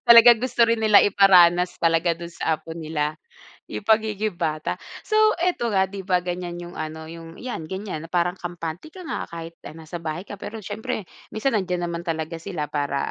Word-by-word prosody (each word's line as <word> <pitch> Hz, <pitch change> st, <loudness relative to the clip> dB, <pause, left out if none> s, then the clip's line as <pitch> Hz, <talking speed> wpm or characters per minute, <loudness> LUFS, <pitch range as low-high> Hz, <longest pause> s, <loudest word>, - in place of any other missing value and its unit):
Talagang 235 Hz, 0 st, +10 dB
gusto 245 Hz, 0 st, +1 dB
rin 230 Hz, -, +3 dB
nila 215 Hz, -2 st, +7 dB
iparanas 180 Hz, -3 st, +5 dB
talaga 165 Hz, +1 st, +3 dB
dun 170 Hz, +1 st, -7 dB
sa 160 Hz, -2 st, -1 dB
apo 160 Hz, +2 st, -9 dB
nila 155 Hz, -2 st, -2 dB, 0.5 s
'yung -, -, -6 dB
pagiging 215 Hz, -1 st, +2 dB
bata. 155 Hz, -2 st, -2 dB, 0.3 s
So, -, -, -5 dB, 0.2 s
ito 345 Hz, -9 st, 0 dB
nga, 190 Hz, -3 st, +3 dB
'di 195 Hz, +1 st, -7 dB
ba, 180 Hz, -1 st, +1 dB
ganyan 175 Hz, -1 st, -4 dB
yung 175 Hz, 0 st, -8 dB
ano, 160 Hz, 0 st, -5 dB
yung 165 Hz, 0 st, -10 dB
yan, 165 Hz, -11 st, -6 dB
ganiyan 190 Hz, -5 st, -5 dB
na 165 Hz, -, -13 dB
parang 175 Hz, 0 st, +1 dB
kampante 175 Hz, -, -6 dB
ka 365 Hz, +2 st, -11 dB
nga -, -, -4 dB
kahit, 165 Hz, 0 st, -7 dB
ah, -, -, -8 dB
nasa 165 Hz, +1 st, -8 dB
bahay 160 Hz, +3 st, -4 dB
ka 205 Hz, -, -8 dB
pero 225 Hz, -, -6 dB
siyempre 205 Hz, 0 st, -4 dB, 0.3 s
minsan 230 Hz, +4 st, 0 dB
nandiyan 180 Hz, -4 st, 0 dB
naman 170 Hz, 0 st, -4 dB
talaga 165 Hz, -1 st, -3 dB
sila 165 Hz, -4 st, -3 dB
para, 145 Hz, -1 st, -2 dB
175 Hz, 190 wpm, -24 LUFS, 165-205 Hz, 0.5 s, Talagang